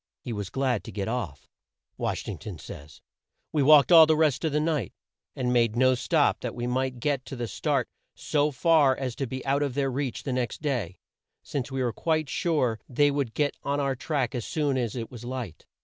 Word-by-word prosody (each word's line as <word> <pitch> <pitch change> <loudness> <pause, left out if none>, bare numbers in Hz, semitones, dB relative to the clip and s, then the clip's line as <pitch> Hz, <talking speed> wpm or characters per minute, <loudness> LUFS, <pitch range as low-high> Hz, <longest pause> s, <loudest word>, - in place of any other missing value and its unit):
He 120 - -6
was 100 -3 -4
glad 130 -1 0
to - - -7
get 100 -2 -3
off," 110 - -4 0.5
Wash - - -3
ing - - -5
ton 100 -6 -7
says, 75 0 -11 0.5
"We 150 - +1
walked 145 +3 +6
all 165 -2 +9
the 155 -1 +3
rest 155 -3 +2
of 160 - +1
the 150 - +1
night, 150 - -1 0.4
and 125 -1 0
made 115 -2 +2
no 130 +1 +4
stop, 145 +4 +2
that 125 - -5
we 120 - -3
might 130 0 -1
get 140 0 0
the 120 -3 -5
start - - -1 0.3
so 150 0 +1
far 145 -1 +3
as 130 -3 -3
to 135 - -2
be 130 +2 -6
out 140 +1 +1
of 140 -3 -1
their 135 -2 0
reach 130 -1 -3
the 135 - -2
next 125 -3 -2
day, 120 - -2 0.5
since 140 -2 -4
we 135 -1 -1
were 120 -2 -1
quite 155 -3 0
sure 130 -11 0
they 145 +3 +3
would 140 -5 -2
get 145 -2 +1
on 140 +1 -1
our 140 -1 0
track 130 -3 -2
as 120 - -3
soon 145 0 -1
as 120 -3 -1
it 115 -2 -5
was 120 -2 -9
light." 120 -8 -6
130 Hz, 215 wpm, -27 LUFS, 120-145 Hz, 0.5 s, all